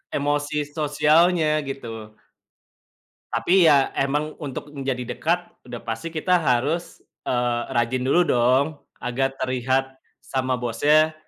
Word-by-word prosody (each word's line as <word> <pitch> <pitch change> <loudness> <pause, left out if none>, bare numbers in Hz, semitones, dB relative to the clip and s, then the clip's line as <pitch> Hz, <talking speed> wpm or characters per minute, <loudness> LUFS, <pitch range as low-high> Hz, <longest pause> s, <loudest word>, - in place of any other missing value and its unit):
emosi 145 +1 -1 0.2
sosialnya 155 +3 +3 0.2
gitu. 135 -3 -6 1.5
Tapi 175 -3 +4
ya 140 -2 +3
emang 150 +3 -1
untuk 145 +1 -6
menjadi 130 -3 -3
dekat 170 +2 0 0.2
udah 120 -1 -9
pasti 115 +9 -4
kita 165 +3 -1
harus, 140 +6 0 0.3
eee, 120 -1 0
rajin 120 +2 +1
dulu 140 +7 +3
dong 125 +2 +3 0.3
agar 135 +2 -1
terlihat 130 +1 -1 0.2
sama 130 -1 -2
bosnya, 150 +7 +2
135 Hz, 110 wpm, -23 LUFS, 125-155 Hz, 1.5 s, Tapi